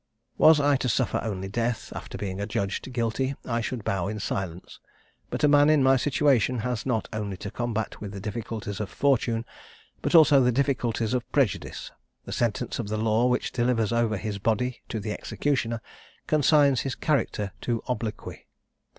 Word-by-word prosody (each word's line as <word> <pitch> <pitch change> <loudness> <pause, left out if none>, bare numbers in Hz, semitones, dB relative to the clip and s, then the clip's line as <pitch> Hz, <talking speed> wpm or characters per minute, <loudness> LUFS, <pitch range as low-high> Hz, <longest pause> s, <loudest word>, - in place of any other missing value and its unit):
Was 155 -1 +7
I 145 -1 +3
to 130 - -1
suffer - - +1
only 95 -4 -4
death, 115 +3 -2
after - - -7
being 95 -1 -4
adjudged 100 +4 -3
guilty, 125 +3 -1
I 120 -1 -1
should 115 -1 -4
bow 95 -2 -1
in 105 +1 -4
silence; 95 -3 -4 0.5
but - - -4
a - - +7
man 145 0 +5
in 155 -3 +4
my 135 0 +5
situation 130 -2 +2
has 125 -1 -2
not 115 -4 0
only 105 -3 -3
to 100 +1 -6
combat 115 -3 -3
with 105 -2 -5
the 100 - -7
difficulties 110 0 -5
of 105 -3 -3
fortune, 120 -4 +1 0.6
but - - 0
also 150 -4 +7
the 125 0 +3
difficulties 120 -3 0
of 125 -1 -2
prejudice: 135 -10 -1 0.3
the - - -7
sentence 115 0 -1
of 115 - -3
the 110 +1 -2
law 110 +2 +2
which 125 0 0
delivers 120 -3 +1
over 115 -2 +1
his 105 0 -4
body 115 +4 -1
to 110 - -3
the 105 +1 -4
executioner, 115 -1 -1 0.4
consigns 145 -3 +4
his 135 -2 -3
character 115 -8 0
to 115 -2 -2
obloquy. 110 -3 -5
115 Hz, 175 wpm, -26 LUFS, 105-130 Hz, 0.6 s, Was